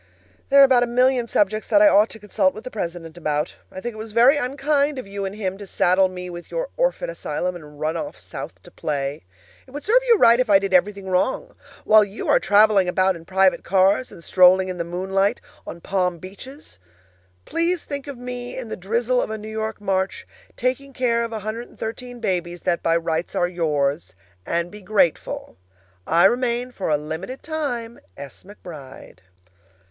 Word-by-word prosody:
There 275 0 +8
are 260 -3 +5
a - - -1
million 250 0 +2
subjects 215 0 0
that 305 - +4
I 310 - +7
ought 215 -6 +5
to - - -10
consult 205 -2 0
with 215 - -9
the 255 - -7
president 170 -4 -5
about. 150 -1 -2
I - - -7
think 240 +4 -5
it - - -12
was 220 -1 -8
very 245 +5 +6
unkind 285 +1 0
of 255 - -5
you 200 0 -5
and 195 +1 -5
him 195 -2 -4
to 205 - -9
saddle 185 +1 +3
me 180 -1 -7
with 175 -1 -9
your - - -3
orphan - - 0
asylum 180 - -3
and 150 -3 -12
run 155 +2 -1
off 290 - -5
South - - -9
to - - -15
play. 140 - -3 0.4
It - - -17
would 285 +3 -7
serve 480 +4 +4
you 465 -2 +6
right 235 -8 +6
if 250 -3 +1
I 200 - +7
did 195 -1 -3
everything 195 +2 +2
wrong. 260 - -1 0.3
While 215 0 +7
you 205 +1 -6
are - - +5
traveling 205 -1 +4
about 185 +1 +2
in 165 0 -12
private 190 +1 +2
cars, 195 +6 +2
and 170 - -13
strolling 185 +1 +5
in 180 -1 -5
the - - 0
moonlight 190 +5 0 0.3
on 170 - -8
palm 180 -2 -1
beaches, 205 - -11 0.7
please 335 +1 -1
think 285 -1 -6
of 280 -3 -7
me 245 0 -6
in 250 -3 -6
the - - -4
drizzle 235 +6 0
of - - -3
a 220 - -4
New 215 0 -8
York 220 0 -4
March, 190 -2 -2 0.3
taking 260 +2 -2
care 235 -2 +1
of 230 - -3
113 230 +2 -6
babies 175 -5 -2
that 175 -1 0
by 165 0 +2
rights 165 0 -2
are 175 - +2
yours 150 - -1 0.3
and 170 +1 -1
be 210 - -11
grateful. 190 - 0 0.5
I 170 +3 +4
remain 245 +2 +1
(for 195 - -4
a 150 - +3
limited 160 - -6
time), 245 -7 -4 0.2
S. 140 -2 -10
McBRIDE. 155 - -12
205 Hz, 195 wpm, -22 LUFS, 180-245 Hz, 0.7 s, There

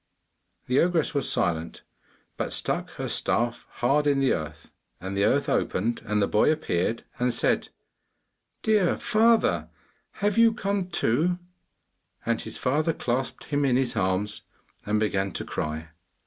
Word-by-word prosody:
The 125 +2 +2
ogress 170 -2 +2
was 140 -2 +1
silent, 80 -1 -1 0.5
but - - -3
stuck - - -1
her - - -4
staff 120 0 0
hard 145 +4 +1
in 140 -1 +3
the 135 -1 +3
earth, 80 0 -6 0.3
and 95 +2 -5
the 100 +1 +2
earth - - +2
opened, 115 +5 0
and 105 0 +1
the 100 - +2
boy 105 - +3
appeared 115 - -1 0.2
and 125 0 +2
said, - - +1 0.9
'Dear 210 -5 +3
father, 225 +1 +2 0.4
have 205 +2 0
you 230 -1 +5
come 200 -4 -2
too?' 170 +3 +2 0.9
And 115 -1 0
his - - -7
father 155 +5 +1
clasped 125 0 -2
him 145 -1 -1
in 130 -3 +3
his 130 -2 +1
arms, 100 0 -1 0.5
and 105 +1 +2
began 100 -3 0
to - - -4
cry. 80 +1 -4
125 Hz, 150 wpm, -26 LUFS, 105-165 Hz, 0.9 s, you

